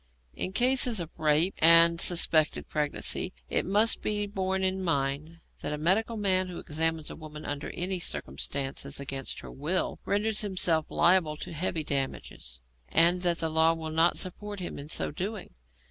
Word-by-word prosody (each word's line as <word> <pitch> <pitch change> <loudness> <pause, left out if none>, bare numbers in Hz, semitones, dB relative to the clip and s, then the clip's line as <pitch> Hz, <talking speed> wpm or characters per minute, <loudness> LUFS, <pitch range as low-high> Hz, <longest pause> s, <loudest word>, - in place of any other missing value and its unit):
In 185 - -4
cases 245 0 +3
of 170 -2 -6
rape 155 +4 +2
and 165 +1 +8
suspected 165 -3 +3
pregnancy, 150 -1 -2 0.2
it - - 0
must 210 +4 +3
be 210 -1 -2
borne 190 -1 -2
in 190 0 0
mind 150 0 -2 0.2
that 150 - -4
a - - -3
medical 200 +9 0
man 185 -3 +2
who 180 -2 -8
examines 160 0 -2
a - - -8
woman 155 -1 -10
under 145 0 -5
any 185 +1 -3
circumstances 135 - -3
against 135 -1 -5
her - - -11
will 155 +7 -2
renders 210 +1 0
himself 180 -6 +1
liable 170 -3 +2
to 165 - -8
heavy 165 0 -2
damages, 135 - -5 0.3
and 175 - +4
that 175 -2 +1
the 165 - -2
law 160 +1 +3
will 160 -1 -6
not 165 +2 +2
support 205 +2 -4
him 175 - -6
in 145 +1 -8
so - - -1
doing. 190 - -6
170 Hz, 165 wpm, -27 LUFS, 150-190 Hz, 0.3 s, and